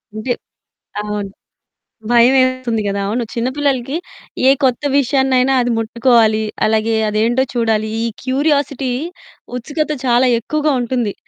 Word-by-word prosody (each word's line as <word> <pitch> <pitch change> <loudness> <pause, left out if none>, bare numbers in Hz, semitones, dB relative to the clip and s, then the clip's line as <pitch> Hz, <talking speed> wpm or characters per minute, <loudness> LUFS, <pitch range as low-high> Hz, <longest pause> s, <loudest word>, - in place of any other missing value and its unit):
అంటే 215 +4 -3 0.7
అవును. 210 -1 -4 0.8
భయమేస్తుంది 255 -1 +3
గదా! 200 0 -1
అవును. 235 +4 -1
చిన్న 235 0 -1
పిల్లలకి 275 -1 -1 0.5
ఏ - - +8
కొత్త 255 0 +2 0.2
విషయాన్నైనా 265 -1 +2
అది 245 0 0
ముట్టుకోవాలి, 225 -1 +2 0.2
అలాగే 220 +1 +1
అదేంటో 230 +5 +1
చూడాలి, 225 -2 0 0.2
ఈ - - 0 0.2
క్యూరియాసిటీ 280 -1 0 0.7
ఉత్సుకత 300 +5 -3
చాలా 245 +1 +3
ఎక్కువగా 300 +5 -1
ఉంటుంది. 240 -4 -1
245 Hz, 110 wpm, -17 LUFS, 225-265 Hz, 0.8 s, ఏ